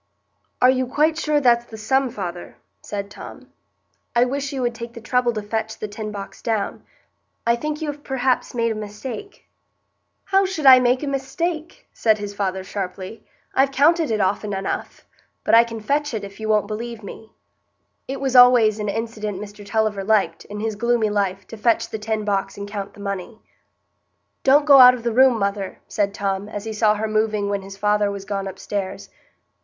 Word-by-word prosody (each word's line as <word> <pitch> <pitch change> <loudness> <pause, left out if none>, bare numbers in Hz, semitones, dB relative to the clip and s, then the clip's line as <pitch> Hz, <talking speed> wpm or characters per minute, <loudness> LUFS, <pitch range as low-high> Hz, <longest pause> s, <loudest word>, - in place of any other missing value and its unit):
"Are 250 - +8
you 255 -1 0
quite 305 +5 +2
sure 305 -2 +1
that's 240 -3 +3
the 220 - -10
sum, 265 +5 +1
father?" 180 -6 -7 0.2
said 200 -1 -5
Tom. - - -11 0.6
"I 240 +1 +5
wish 275 +2 -3
you 265 -2 -3
would 240 -1 0
take 235 0 -8
the 235 - -9
trouble 245 +1 +1
to 215 -1 -4
fetch 220 +1 -3
the 215 - -5
tin 210 +1 -6
box 200 -1 -8
down. 220 -3 -2 0.6
I 235 0 +4
think 300 +5 -4
you 300 - -1
have 290 0 -14
perhaps 260 -1 -1
made 230 -1 +1
a - - 0
mistake." 220 - -8 0.8
"How 390 0 +3
should 375 -6 -3
I 260 -1 +10
make 250 +2 +2
a - - -2
mistake?" 315 +4 -3
said 220 -2 +2
his 205 -1 -6
father, 190 -2 -2
sharply. 190 +2 -6 0.3
"I've 270 +1 +3
counted 310 +4 +3
it 220 -1 0
often 205 +1 0
enough; 195 0 -4 0.4
but - - 0
I 230 +1 +9
can 230 -1 -7
fetch 285 +4 -1
it, 210 - -4
if 200 +1 -10
you 220 0 -4
won't 210 -1 +3
believe 225 +1 -6
me." 220 +2 -11 0.7
It 270 +1 -4
was 265 -1 -1
always 245 -4 +7
an 210 -1 -2
incident 215 -2 -4
Mr 205 0 -9
Tulliver 210 -1 0
liked, 215 0 +1
in 210 0 -7
his 220 -1 -2
gloomy 235 -1 +1
life, 195 -2 -1
to 225 - -8
fetch 230 +1 +2
the 220 - -5
tin 215 0 -2
box 195 -1 -1
and 200 0 -6
count 200 -1 -6
the - - -15
money. 200 +2 -5 1.0
"Don't 285 +2 +5
go 280 -2 +8
out 250 0 +9
of 240 - -9
the 235 -1 -1
room, 260 0 +5
mother," 200 -1 -2
said 200 -1 0
Tom, 200 0 -3
as 205 -1 -6
he 220 - -4
saw 215 0 +3
her 215 +1 -2
moving 215 -1 0
when 200 -1 -1
his 195 0 -10
father 210 0 +2
was 200 -1 -6
gone 195 -1 -3
upstairs. 195 0 -5
220 Hz, 195 wpm, -22 LUFS, 205-255 Hz, 1.0 s, I